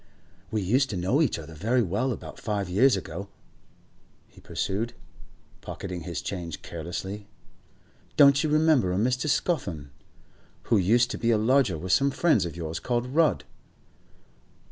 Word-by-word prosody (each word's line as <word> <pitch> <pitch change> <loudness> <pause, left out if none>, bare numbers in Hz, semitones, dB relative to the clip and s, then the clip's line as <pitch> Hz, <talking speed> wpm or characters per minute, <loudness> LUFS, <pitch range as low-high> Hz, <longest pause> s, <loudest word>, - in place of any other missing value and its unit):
'We 110 -2 -1
used 130 +8 +2
to 100 - -3
know 95 - +1
each 145 - +1
other 80 0 -9
very 115 +10 +1
well 105 +8 -1
about - - -7
five 105 -3 -2
years 120 +4 +4
ago,' 95 +2 -6 1.0
he - - -19
pursued, 110 +5 -3 0.7
pocketing 90 -2 -6
his 85 +1 -5
change 85 -5 -5
carelessly. 95 +5 -6 0.9
'Don't 140 -1 +6
you 155 - 0
remember 155 - +3
a 90 - -1
Mr. 125 +7 0
Scawthorne, 85 - -1 0.7
who 115 - +2
used 115 +6 +3
to - - -5
be 115 - 0
a 115 - +4
lodger 125 - +2
with 90 +3 -4
some 135 +9 +4
friends 155 - +2
of 85 - -8
yours 80 -1 -4
called 120 -1 -1
Rudd? 160 0 +3
105 Hz, 150 wpm, -26 LUFS, 90-130 Hz, 1.0 s, Don't